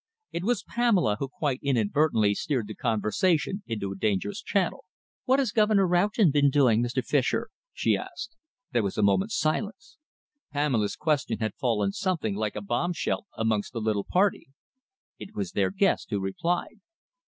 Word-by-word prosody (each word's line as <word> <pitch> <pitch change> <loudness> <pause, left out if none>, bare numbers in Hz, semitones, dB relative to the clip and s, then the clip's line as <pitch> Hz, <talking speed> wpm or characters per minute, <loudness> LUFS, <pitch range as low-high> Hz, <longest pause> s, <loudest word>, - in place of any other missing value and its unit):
It 170 - -3
was 235 0 0
Pamela 205 - +2
who 140 - -2
quite 140 -1 -2
inadvertently 120 -3 +2
steered 125 +1 -1
the 110 - -7
conversation 150 - 0
into 105 -3 -3
a - - -5
dangerous 100 0 -1
channel. 190 -4 -1 0.4
"What 260 +1 +4
has 265 -6 +1
Governor 210 -2 +3
Roughton 180 +1 +3
been 145 0 +4
doing, 130 -5 +4
Mr. 120 +1 -1
Fischer?" 150 - +1 0.2
she - - +1
asked. 345 -13 -7 0.4
There 120 -3 +2
was 100 -2 -3
a 105 - +2
moment's 195 - +2
silence. 225 - -2 0.5
Pamela's 135 -8 0
question 150 -3 0
had 110 -3 -2
fallen 105 -6 0
something 165 - -1
like 105 +1 -2
a 105 - -4
bombshell 155 - -1
amongst 110 -1 0
the 115 - -3
little 110 -2 0
party. 195 +2 +2 0.7
It 215 - -10
was 200 -2 -3
their - - +1
guest 195 -1 +1
who 105 - -1
replied. 170 - -2
145 Hz, 160 wpm, -27 LUFS, -, 0.7 s, What